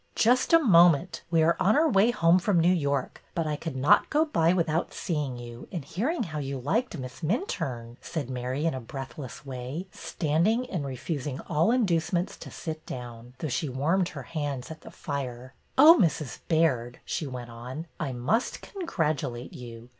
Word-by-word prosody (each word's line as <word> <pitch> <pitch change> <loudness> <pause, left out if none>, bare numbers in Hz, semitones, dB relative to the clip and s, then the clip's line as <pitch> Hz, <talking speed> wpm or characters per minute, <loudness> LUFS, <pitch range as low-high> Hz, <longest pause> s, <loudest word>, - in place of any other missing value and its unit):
'' - - -36
Just 250 +3 +3
a 330 - +9
moment. 175 - +5
We 165 -1 +3
are 170 +1 +4
on 195 +4 +4
our 320 +2 +4
way 215 -4 +4
home 175 -6 +4
from 180 0 +2
New 175 +2 +4
York, 140 -6 -1
but 165 -2 0
I 150 -1 -1
could 160 -1 -5
not 145 +11 +4
go 310 +1 +3
by 165 - +2
without 170 -2 0
seeing 150 -7 -2
you, 120 0 -9
and 170 -8 -4
hearing 240 - -1
how 155 -6 -5
you 140 -1 -3
liked 190 - -1
Miss 130 -2 -7
Minturne," 140 - -2
said 155 -6 -4
Mary 130 +3 -3
in 165 - +2
a 130 - -3
breathless 135 +2 -8
way, 130 +6 -5
stand 160 +2 0
ing, 235 +3 +1
and 155 -7 -2
refusing 135 +1 -4
all 165 +3 +1
inducements 180 -6 +1
to - - -9
sit 160 -2 -6
down, 120 0 -8
though 155 - -3
she 145 +2 -1
warmed 165 +8 +1
her 140 -3 -7
hands 145 -1 -4
at 160 - -9
the - - -11
fire. 130 -3 -5 0.2
Oh, 305 +5 +10
Mrs. 155 -6 0
Baird," 130 -8 +1
she 155 - -2
went 125 -2 -7
on, 125 +7 -7
'' - - -38
I 150 -4 -2
must 135 - 0
congratulate 155 - -2
you. 120 -1 -10
155 Hz, 190 wpm, -27 LUFS, 130-180 Hz, 0.2 s, Oh